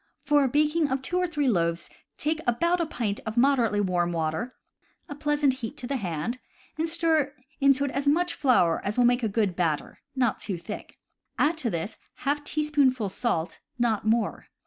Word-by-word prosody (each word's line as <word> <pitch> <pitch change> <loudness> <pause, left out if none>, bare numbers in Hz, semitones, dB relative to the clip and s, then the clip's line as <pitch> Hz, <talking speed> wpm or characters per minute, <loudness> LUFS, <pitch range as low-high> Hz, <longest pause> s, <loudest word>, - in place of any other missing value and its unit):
For 290 -1 +4
a - - +3
baking 300 +3 +2
of 265 0 -1
two 360 +6 -1
or 360 - +1
three 295 -5 -1
loaves 170 -6 +1 0.3
take 310 +1 -1
about 340 +9 +2
a 335 - -1
pint 215 -8 -2
of 220 +1 -5
moderately 240 -5 +3
warm 175 -3 +1
water 165 +9 -2 0.5
(a - - -6
pleasant 295 -1 +1
heat 225 - -5
to 255 - -4
the 275 +2 -1
hand) 185 +4 -3 0.4
and 320 +2 -1
stir 320 -4 +1 0.2
into 275 0 +4
it 280 - -2
as 275 +1 -2
much 345 +4 +3
flour 235 - +3
as 205 +3 -3
will 245 - +5
make 245 +1 +3
a 225 - +1
good 200 -3 0
batter, 160 -5 -1 0.2
not 250 -4 +1
too 195 -4 -3
thick. 170 - -8 0.4
Add 310 +3 +3
to 255 -7 -1
this 180 +3 -4 0.2
^ 290 +1 0
teaspoonful 285 -8 +1
salt, 175 -6 -2 0.2
not 235 -3 +1
more. 220 +1 0
255 Hz, 190 wpm, -27 LUFS, 205-295 Hz, 0.5 s, will